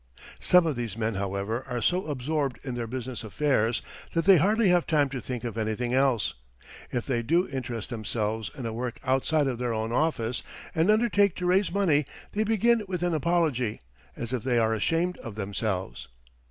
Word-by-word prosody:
Some 180 -1 +5
of 155 -4 0
these 115 -4 -4
men, 110 0 0
however, 100 +4 -2
are 125 -1 -1
so 180 +9 +1
absorbed 145 -1 -1
in 130 - -4
their 120 -1 -3
business 125 0 -5
affairs 115 -1 +1 0.3
that 165 -1 +1
they 195 -2 +8
hardly 210 +5 +3
have 175 -1 +3
time 145 -3 +3
to 130 -2 -5
think 125 -2 -5
of 115 -2 -4
anything 110 +3 -1
else. 130 -4 +2 0.6
If 120 - -2
they 120 -4 0
do 170 +10 +2
interest 125 -4 -5
themselves 110 -1 -2
in 130 - -5
a 115 - -3
work 120 +1 -4
outside 135 +3 +2
of 125 -3 -2
their 120 -2 -1
own 110 +1 -2
office 125 -4 0 0.3
and 165 +3 +2
undertake 210 -3 +4
to 180 - -4
raise 185 +2 +3
money, 170 -7 +2 0.3
they 215 - 0
begin 225 +2 +3
with 180 -2 -3
an 175 -1 +1
apology, 155 -8 +1 0.4
as 120 +1 -4
if 125 - -1
they 125 +1 +1
are 110 -1 +3
ashamed 165 - 0
of 115 -3 -8
themselves. 100 -2 -3
130 Hz, 190 wpm, -27 LUFS, 115-165 Hz, 0.6 s, they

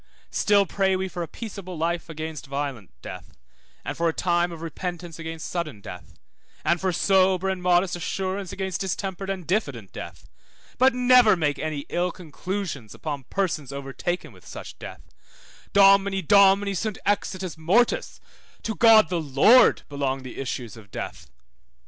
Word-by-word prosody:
Still 205 -1 +3
pray 190 +1 +1
we 190 0 -2
for 180 -1 -6
a 170 - -3
peaceable 195 -3 -8
life 170 +2 -2
against 155 -2 -6
violent 140 -7 -4
death, - - -9 0.5
and - - -3
for 165 0 +1
time 175 +1 +1
of 165 -1 -8
repentance 175 0 -6
against 165 -1 -6
sudden 155 - -4
death, 90 -2 -11 0.5
and 170 - +2
for 190 -1 +1
sober 190 +1 +3
and 190 -1 -2
modest 180 0 +2
assurance 190 +2 -3
against 190 -2 -3
distempered 190 0 -3
and 190 -3 -4
diffident 140 - -2
death, - - -9 0.5
but 260 0 +5
never 250 -4 +6
make 150 -4 -1
ill 155 +4 -2
conclusions 170 - -5
upon 145 -4 -5
persons 160 -7 -2
overtaken 140 +6 -4
with - - -18
such - - -9
deaths; - - -9 0.7
Domini 195 -1 +5
Domini 200 0 +5
sunt 210 +2 -2
exitus 190 -3 -1
mortis, 235 - +1 0.4
to 220 - -2
God 220 -1 +6
the 175 -2 -1
Lord 155 - +5
belong 135 -2 -2
the 130 - -8
issues 125 -4 -4
of 110 -3 -14
death. - - -7
180 Hz, 150 wpm, -25 LUFS, 155-195 Hz, 0.7 s, never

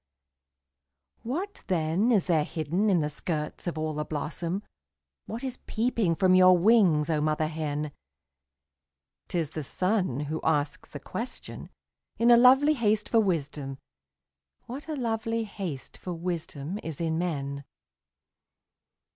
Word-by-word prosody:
What 355 - -4
then 180 +6 +1
is 205 -6 +3
there 165 -4 +3
hidden 165 +7 -1
in 180 -4 +3
the 150 - 0
skirts 150 +2 -3
of 170 - -2
all 155 0 -1
the 150 0 -2
blossom, 165 +5 -3 0.6
What 230 +4 -5
is 260 -2 -4
peeping 220 -6 +1
from 185 +1 +4
your 185 0 +7
wings, 175 -6 +4
oh 150 -1 +1
mother 155 +1 +1
hen? 150 -1 -3 1.4
'T - - -3
is 160 -3 -1
the 155 - -4
sun 185 - 0
who 155 +2 -3
asks 145 -2 0
the 145 - -7
question, 230 - -6 0.5
in 235 +1 +5
a - - +10
lovely 265 +5 +6
haste 215 -5 +1
for 230 - +4
wisdom 145 -8 -1 0.9
What 270 +6 -7
a 310 - -2
lovely 230 -2 -1
haste 185 -10 -6
for 180 - -5
wisdom 170 0 -4
is 160 -3 -6
in 165 -1 0
men? 140 -5 -3
175 Hz, 140 wpm, -28 LUFS, 155-220 Hz, 1.4 s, a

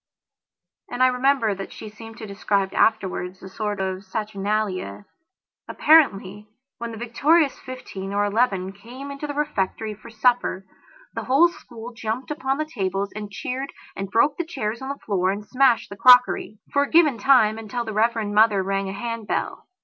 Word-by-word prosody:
And 250 - 0
I - - +7
remember 250 -3 +2
that 195 0 -7
she - - -9
seemed 225 +1 -11
to 225 - -7
describe 200 -1 -1
afterwards 190 -4 0
a - - -7
sort 210 +1 -3
of 190 0 -3
saturnalia. 200 - -3 0.6
Apparently, 210 -10 +3 0.3
when 235 0 -5
the 225 - -8
victorious 280 +7 +2
fifteen 200 -7 -7
or 205 +1 +1
eleven 200 -3 0
came 245 +8 -10
into 280 +2 -6
the 290 - -5
refectory 220 -7 -2
for 210 - -14
supper, 230 -4 +1 0.5
the - - -5
whole 285 +7 +5
school 240 -7 -11
jumped 230 +4 -4
upon 270 -2 -1
the 310 - -1
tables 195 -7 -3
and 210 -1 -6
cheered 255 +8 -5 0.2
and 195 0 -5
broke 280 +8 +2
the 345 - -1
chairs 235 -8 -4
on 265 - -5
the 280 - -4
floor 190 -3 +1
and 205 +2 -3
smashed 250 +1 +2
the 200 - -8
crockeryfor 250 +2 +4
a 285 - -4
given 310 -8 +4
time, 225 -3 +4
until 235 +2 -4
the 220 - -5
Reverend 220 -1 0
Mother 210 -2 +4
rang 195 0 -1
a - - -5
hand 230 0 -5
bell. - - -3
220 Hz, 170 wpm, -23 LUFS, 200-255 Hz, 0.6 s, I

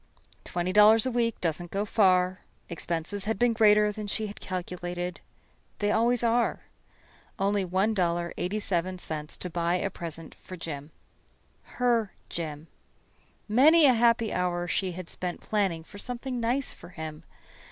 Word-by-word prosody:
Twenty 180 +1 -2
dollars 215 +2 +7
a 260 - 0
week 235 -2 0
doesn't 175 +1 -1
go 200 +3 -1
far. 185 -3 +3 0.3
Expenses 170 +3 -3
had 220 0 -1
been 240 +2 +3
greater 210 -2 +5
than 210 0 -6
she 215 +2 -1
had 205 0 -8
calculated. 180 -1 -5 0.6
They 205 0 0
always 235 +2 +2
are. 235 0 +2 0.8
Only 200 0 +1
$1.87 180 -3 -1
to 180 - -5
buy 170 +1 0
a 195 +2 -1
present 165 -2 -7
for 185 - -9
Jim. 150 -3 -6 0.9
Her 235 -4 +2 0.2
Jim. 155 -2 -5 0.8
Many 295 +9 +6
a 260 - +7
happy 230 -1 +3
hour 175 -1 -1
she 185 +1 -1
had 180 0 -7
spent 180 0 -4
planning 195 -6 -1
for 205 +5 -12
something 250 +2 -3
nice 245 +4 0
for - - -13
him. 160 -3 -7
190 Hz, 140 wpm, -28 LUFS, 175-220 Hz, 0.9 s, dollars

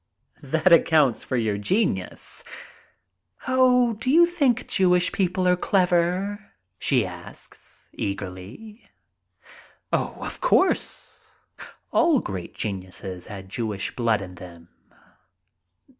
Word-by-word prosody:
"That 160 +5 +2
accounts 155 -7 +4
for 130 - -2
your 110 -3 -1
genius." 105 - -2 1.0
"Oh, 250 -2 +4
do 225 +4 -3
you 335 +5 +7
think 290 -9 +1
Jewish 180 -1 +3
people 185 -1 0
are 180 - +4
clever?" 185 +3 0 0.3
she - - +2
asks, - - -11
eagerly. 100 - -7 1.0
"Of - - -3
course. 375 - +1 0.6
All 325 -5 +4
great 95 - -6
geniuses 95 -2 -5
had 95 -2 -9
Jewish 105 -1 -4
blood 115 -4 +1
in 90 -1 -9
them. 85 -2 -12
170 Hz, 100 wpm, -24 LUFS, -, 1.0 s, you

